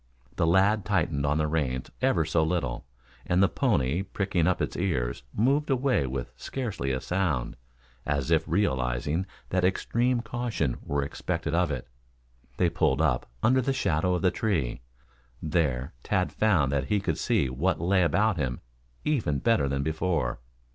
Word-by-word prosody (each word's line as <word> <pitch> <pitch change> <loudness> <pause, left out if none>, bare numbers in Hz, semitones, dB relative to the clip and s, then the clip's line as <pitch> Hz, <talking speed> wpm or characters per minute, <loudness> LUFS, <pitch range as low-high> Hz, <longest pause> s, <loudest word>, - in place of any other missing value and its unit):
The 80 - +1
lad 100 +4 +4
tightened 85 -8 0
on 75 +1 +2
the 80 - +1
reins 70 -5 -1
ever 100 -12 +2
so 80 +1 +2
little, 80 -8 -2 0.4
and 90 +2 +2
the - - +6
pony 70 0 +1
pricking 95 -4 -1
up 90 - +2
its - - -2
ears 70 -11 -1
moved 140 +8 +1
away 130 - +2
with 65 -1 -4
scarcely 105 - -3
a 65 - -1
sound, 80 -6 -1 0.5
as 70 -2 -1
if - - +4
realizing 75 -1 0 0.2
that 95 0 +1
extreme 120 +6 +1
caution 115 - -2
were 70 0 -1
expected 80 +3 -3
of 85 0 +2
it. 65 -3 -4 0.7
They 90 - +3
pulled 80 -4 +1
up 65 -8 +1
under 130 +3 +4
the 135 +2 0
shadow 90 -5 +1
of 90 - -3
the 90 - +4
tree. 85 - -1 0.6
There, 75 -3 -1
Tad 95 -3 0
found 90 -11 +2
that 70 -1 0
he 105 +8 +1
could - - -2
see 70 - +2
what 75 +9 0
lay 95 +3 +2
about 95 +5 +2
him 65 -5 -2 0.5
even 115 - +1
better 90 -2 +2
than 70 0 -1
before. 80 -4 -1
85 Hz, 160 wpm, -27 LUFS, 70-100 Hz, 0.7 s, the